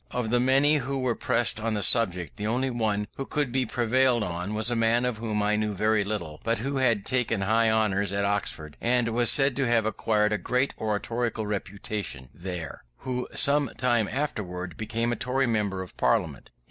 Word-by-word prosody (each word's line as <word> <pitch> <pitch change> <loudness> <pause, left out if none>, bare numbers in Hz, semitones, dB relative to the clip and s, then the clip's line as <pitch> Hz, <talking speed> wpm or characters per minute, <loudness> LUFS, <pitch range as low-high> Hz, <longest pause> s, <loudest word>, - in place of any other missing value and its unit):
Of 120 -3 -2
the 120 - +3
many 135 +4 +4
who 135 0 -2
were 130 -2 0
pressed 115 -1 0
on 110 0 -1
the 105 - -1
subject, 90 -8 +1
the 105 0 -3
only 130 +4 0
one 110 -3 0
who 135 - -3
could 145 -5 -1
be 130 -1 0
prevailed 120 0 +2
on 90 +3 -3
was 110 +3 +2
a - - +1
man 115 +2 +2
of 125 -3 -1
whom 110 -2 -1
I 105 +1 +2
knew 105 -1 -1
very 110 +1 +2
little, 90 -7 -4
but 115 0 +1
who 135 +5 -2
had 115 -6 +2
taken 115 -5 0
high 110 +3 +3
honours 100 -3 +1
at 100 0 0
Oxford 90 -7 -2
and 120 0 +2
was 120 +1 +2
said 135 -2 +3
to 135 -3 +1
have 115 -2 +2
acquired 105 0 +1
a 105 - 0
great 125 +2 0
oratorical 110 +1 -2
reputation 100 -9 -4
there; 85 -2 -6 0.2
who 125 -1 -2
some 145 -1 +3
time 120 -4 +2
afterwards 90 - -3
became 115 +5 -2
a - - 0
Tory 130 +4 0
member 105 -5 -1
of 90 - -13
Parliament. - - 0
110 Hz, 200 wpm, -27 LUFS, 105-125 Hz, 0.2 s, many